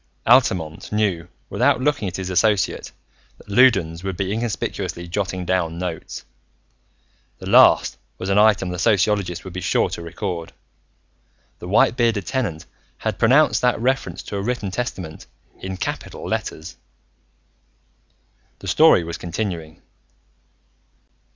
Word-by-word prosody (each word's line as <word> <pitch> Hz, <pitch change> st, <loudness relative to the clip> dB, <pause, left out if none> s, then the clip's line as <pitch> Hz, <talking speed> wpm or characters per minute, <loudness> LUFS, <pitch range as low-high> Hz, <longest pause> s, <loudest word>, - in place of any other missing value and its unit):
Altamont 95 Hz, -10 st, +2 dB
knew 100 Hz, -6 st, 0 dB, 0.2 s
without -, -, +2 dB
looking 140 Hz, -5 st, 0 dB
at 90 Hz, -, -5 dB
his 95 Hz, -1 st, -4 dB
associate 105 Hz, 0 st, +1 dB, 0.5 s
that -, -, -19 dB
Loudons 100 Hz, -8 st, +3 dB
would 95 Hz, -2 st, -4 dB
be 95 Hz, +1 st, -1 dB
inconspicuously 110 Hz, -5 st, -3 dB
jotting 95 Hz, 0 st, -3 dB
down 85 Hz, -3 st, -1 dB
notes. 85 Hz, -2 st, -6 dB, 1.1 s
The -, -, -10 dB
last -, -, +5 dB, 0.2 s
was 95 Hz, -, -5 dB
an 100 Hz, +1 st, +3 dB
item 105 Hz, -3 st, +4 dB
the 90 Hz, 0 st, -4 dB
sociologist 100 Hz, -4 st, +1 dB
would 95 Hz, -, -9 dB
be 95 Hz, -, -5 dB
sure -, -, +1 dB
to -, -, -5 dB
record: 85 Hz, -1 st, -5 dB, 1.1 s
the 90 Hz, -, -8 dB
white 105 Hz, +4 st, +3 dB
bearded 115 Hz, -5 st, +1 dB
Tenant 100 Hz, -12 st, -3 dB, 0.3 s
had 110 Hz, -4 st, -3 dB
pronounced 130 Hz, +7 st, +4 dB
that 125 Hz, -2 st, +2 dB
reference 130 Hz, +3 st, -1 dB
to 100 Hz, -, -5 dB
a -, -, -2 dB
written 110 Hz, -3 st, -2 dB
testament 90 Hz, -8 st, -5 dB, 0.3 s
in 95 Hz, 0 st, -5 dB
capital -, -, -5 dB
letters. 80 Hz, -, -4 dB, 1.8 s
The -, -, -10 dB
story -, -, +5 dB
was 85 Hz, 0 st, -6 dB
continuing.... 85 Hz, -3 st, -5 dB
95 Hz, 130 wpm, -21 LUFS, 85-110 Hz, 1.8 s, last